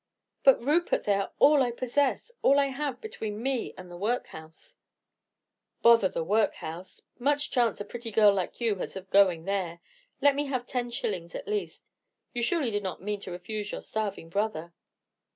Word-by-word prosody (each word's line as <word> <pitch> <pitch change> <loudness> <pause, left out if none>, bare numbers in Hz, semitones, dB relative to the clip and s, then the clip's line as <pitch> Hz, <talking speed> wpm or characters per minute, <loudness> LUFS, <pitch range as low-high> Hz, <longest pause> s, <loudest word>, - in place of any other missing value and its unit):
"But, 270 - +7
Rupert, 305 +8 +1
they 205 - +2
are 195 0 -1
all 290 -1 +6
I 250 - +2
possess, 255 - 0
all 280 - +5
I 280 -1 +2
have 270 -1 -3
between 220 - -5
me 265 -2 -1
and 180 -1 -10
the - - -8
workhouse." 210 - -5 1.1
"Bother 230 -5 +6
the 165 - -3
workhouse! 185 -3 -2 0.2
Much 290 +3 +1
chance 235 -4 +2
a 205 - -4
pretty 235 +2 -6
girl 210 -2 +5
like 190 -2 -3
you 225 -4 +1
has - - -5
of 190 0 -9
going 185 -5 +4
there. 185 -4 -2 0.4
Let 285 0 +5
me 290 +1 -1
have 255 -3 -2
ten 245 -1 -2
shillings 180 -8 -3
at - - -6
least. 420 -1 -4 0.4
You 240 - -2
surely 255 0 +1
do 205 - 0
not 190 -1 -5
mean 210 0 -2
to 190 - -8
refuse 205 +4 -5
your - - -5
starving 205 -6 -4
brother?" 170 -4 -2
220 Hz, 180 wpm, -28 LUFS, 190-260 Hz, 1.1 s, But